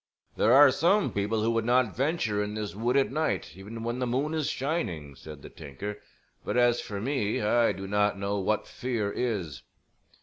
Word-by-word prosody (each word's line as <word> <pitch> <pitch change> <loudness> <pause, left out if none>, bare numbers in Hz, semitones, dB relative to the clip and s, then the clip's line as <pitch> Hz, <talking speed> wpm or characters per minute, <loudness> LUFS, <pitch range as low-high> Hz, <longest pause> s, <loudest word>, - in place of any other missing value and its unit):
"There 110 - +3
are 140 +1 +8
some 190 +8 +2
people 105 +2 0
who 115 - +2
would 115 -1 0
not 120 -2 +2
venture 130 -7 0
in 105 +1 -5
this 105 -1 -4
wood 120 +6 0
at 135 - +2
night 135 - -1
even 105 +4 -8
when 120 +2 -3
the 125 - -1
moon 135 +6 -1
is 155 -3 -1
shining," 105 - -3
said 70 +1 -11
the - - -9
tinker; 90 +8 -7 0.4
"but - - -2
as 120 -1 +3
for 100 -1 -6
me 115 -2 -1
I 115 +2 +3
do 95 0 -6
not 105 +1 +1
know 100 +1 -2
what 105 +2 0
fear 115 -5 -3
is." 100 - -3
110 Hz, 195 wpm, -28 LUFS, 100-130 Hz, 0.4 s, are